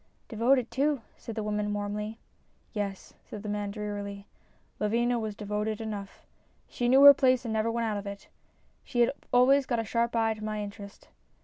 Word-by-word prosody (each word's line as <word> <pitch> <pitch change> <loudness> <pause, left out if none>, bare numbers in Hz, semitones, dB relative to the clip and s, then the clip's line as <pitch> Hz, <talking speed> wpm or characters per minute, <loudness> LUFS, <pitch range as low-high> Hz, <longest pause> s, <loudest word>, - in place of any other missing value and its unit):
" - - -40
Devoted, 235 +2 +2
too," 275 0 0
said 225 - -8
the 220 - -2
woman, 210 0 -1
warmly. 210 +2 -4 0.3
" - - -39
Yes," 200 -3 -4 0.2
the 210 0 -7
man 205 0 -2
said 200 - -7
drearily, 205 -1 -5 0.3
" - - -38
Lavinia 235 +3 +1
was 215 -2 -4
devoted 210 +1 -3
enough. 210 -3 -7 0.4
She 240 -1 -1
knew 265 +2 +6
her 285 0 +12
place 255 -2 +2
and 225 - -2
never 220 +1 +1
went 230 0 -1
out 215 -2 -1
of 200 0 -6
it. 200 0 -8 0.6
She 240 - -1
had 235 - +4 0.2
always 265 +2 +5
got 240 - 0
a 225 - 0
sharp 235 +2 0
eye 225 -1 +2
to 215 -1 -10
my 215 -1 -3
interest. 200 0 -10
220 Hz, 200 wpm, -29 LUFS, 205-240 Hz, 0.6 s, her